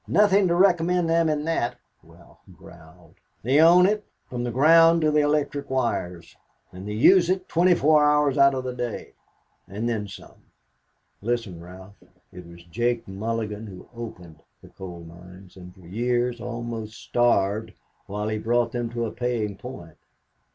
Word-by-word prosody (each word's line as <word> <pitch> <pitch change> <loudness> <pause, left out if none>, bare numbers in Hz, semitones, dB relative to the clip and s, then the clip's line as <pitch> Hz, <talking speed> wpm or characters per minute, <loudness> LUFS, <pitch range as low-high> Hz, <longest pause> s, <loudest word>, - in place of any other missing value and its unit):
"Nothing 200 -2 +3
to 170 - +1
recommend 175 -1 +2
them 165 0 +2
in 150 -1 -2
that," 160 -7 -1 0.3
Ralph - - -20 0.2
growled. 85 0 -17 0.2
"They 130 +6 +2
own 175 +2 +6
it 210 +2 0 0.2
from 120 -1 -5
the 120 - -2
ground 165 +6 +5
to 155 -1 +2
the 150 - +3
electric 145 -1 -1
wires; 90 -10 -3 0.4
and 95 +2 -10
they 105 - -4
use 175 - +5
it 185 0 -1
twenty 175 +2 +3
four 150 0 +4
hours 150 -2 +2
out 140 -1 +4
of 130 - -3
the 130 -1 -4
day 120 -2 -6 0.5
and 105 +5 -4
then 110 -3 -2
some." 100 - -14 0.8
"Listen, 110 -6 -3
Ralph. 95 +3 -13 0.4
It 90 -1 -11
was 85 0 -14
Jake 120 +6 -2
Mulligan 110 +2 -4
who 95 -2 -12
opened 90 -9 -10 0.2
the - - -14
coal 90 -2 -10
mines, 90 +3 -14
and 90 -1 -12
for 95 - -19
years 120 +5 -1
almost 115 -2 -6
starved 110 -2 0 0.3
while 105 +2 -4
he 110 0 -2
brought 120 +1 0
them 120 -1 -3
to 120 -1 -2
a 110 - -5
paying 115 -4 -3
point. 95 -6 -11
120 Hz, 165 wpm, -24 LUFS, 100-150 Hz, 0.8 s, own